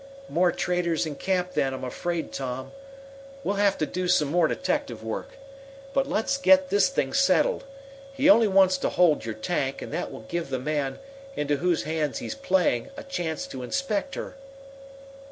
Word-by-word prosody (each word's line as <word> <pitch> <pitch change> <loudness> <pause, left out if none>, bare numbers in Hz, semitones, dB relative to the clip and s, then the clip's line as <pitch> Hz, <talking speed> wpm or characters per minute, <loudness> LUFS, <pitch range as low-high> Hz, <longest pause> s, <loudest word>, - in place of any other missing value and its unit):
"More 175 +1 +3
traitors 170 -2 0
in 155 - -4
camp, 180 -1 -1
then, 135 -5 0
I'm 130 - -8
afraid, 165 +6 -3
Tom. 130 -1 -4 0.7
We'll 200 -5 -1
have 200 -1 +3
to 155 - 0
do 180 +3 -3
some 155 -5 +3
more 170 +1 +3
detective 115 -6 -2
work. 110 0 -5 0.6
But 275 0 +1
let's 275 +3 0
get 280 0 +5
this 410 +4 +4
thing - - -1
settled. - - +3 0.5
He 275 +1 +1
only 230 -7 +7
wants 190 -1 +4
to - - 0
hold 165 -9 +3
your 110 -1 -4
tank, 135 +2 -2
and - - -7
that - - -3
will - - -8
give 165 +7 -4
the 130 - -1
man, 140 0 -2 0.4
into 145 0 0
whose 175 +1 +1
hands 155 -2 -1
he's - - -4
playing, 190 - +1
a - - -7
chance 175 - -3
to 130 - -6
inspect 215 - -2
her." - - -6
175 Hz, 175 wpm, -26 LUFS, 140-200 Hz, 0.7 s, only